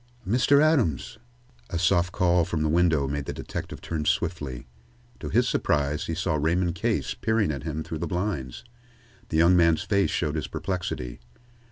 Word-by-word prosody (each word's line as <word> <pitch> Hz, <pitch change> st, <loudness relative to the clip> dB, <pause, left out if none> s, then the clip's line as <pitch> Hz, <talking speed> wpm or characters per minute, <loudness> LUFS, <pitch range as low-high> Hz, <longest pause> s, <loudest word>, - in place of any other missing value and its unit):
"Mr. 125 Hz, +6 st, +4 dB
Adams!" 125 Hz, -, +1 dB, 0.5 s
A 85 Hz, -, -2 dB
soft 85 Hz, +1 st, +2 dB
call 90 Hz, -2 st, +3 dB
from 80 Hz, -1 st, -2 dB
the 80 Hz, -, +1 dB
window 80 Hz, -4 st, +3 dB
made 70 Hz, 0 st, -3 dB
the -, -, -4 dB
detective -, -, -6 dB
turn 80 Hz, -2 st, -3 dB
swiftly. 70 Hz, -6 st, -2 dB, 0.5 s
To 75 Hz, -, -5 dB
his -, -, +2 dB
surprise, 75 Hz, 0 st, 0 dB
he 80 Hz, -, -2 dB
saw 85 Hz, -2 st, 0 dB
Raymond 85 Hz, +3 st, +1 dB
Case 85 Hz, -, -1 dB
peering 110 Hz, -4 st, 0 dB
at 70 Hz, -3 st, -4 dB
him 80 Hz, 0 st, -4 dB
through 80 Hz, -, -6 dB
the -, -, -2 dB
blinds. 70 Hz, -, -3 dB, 0.7 s
The 80 Hz, -, 0 dB
young 85 Hz, +3 st, +5 dB
man's 85 Hz, -2 st, +4 dB
face 100 Hz, -1 st, +1 dB
showed 75 Hz, -3 st, -1 dB
his 75 Hz, -, -3 dB
perplexity. 85 Hz, -10 st, -4 dB
85 Hz, 170 wpm, -26 LUFS, 75-90 Hz, 0.7 s, young